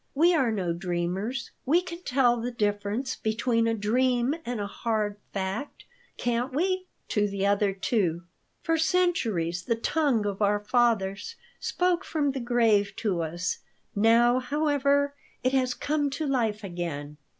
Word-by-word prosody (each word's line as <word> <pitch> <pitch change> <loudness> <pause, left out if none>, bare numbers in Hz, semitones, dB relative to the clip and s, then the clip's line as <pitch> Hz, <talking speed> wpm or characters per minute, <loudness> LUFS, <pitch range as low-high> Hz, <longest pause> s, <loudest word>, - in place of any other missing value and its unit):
We 335 +5 +5
are 265 -8 +2
no 185 -5 -1
dreamers. 180 +8 -3
We 310 +7 +4
can 350 -1 -7
tell 250 -6 +3
the 240 - -2
difference 210 +2 -1
between 230 +1 0
a 225 - +1
dream 245 +4 +1
and 245 -2 -2
a 205 - -2
hard 210 0 -2
fact, 195 +8 -4 0.3
can't 245 +2 -1
we?" 370 +6 0 0.2
to 210 -1 +2
the 200 -1 -2
other 200 0 +2
two. 190 -4 0 0.4
"For 330 -1 +1
centuries 230 - +1
the 230 +5 0
tongue 255 -2 +1
of 200 0 -3
our 205 0 +3
fathers 215 - +1 0.2
spoke 360 0 0
from 295 -6 0
the 270 - -4
grave 230 -4 +2
to 200 -7 -1
us. 175 +3 -2 0.4
Now, 230 +4 +5
however, 285 +1 +1 0.3
it 255 - +2
has 255 -2 +1
come 290 -1 0
to 285 +3 -3
life 225 -6 0
again." 165 -6 -5
230 Hz, 150 wpm, -27 LUFS, 200-275 Hz, 0.4 s, We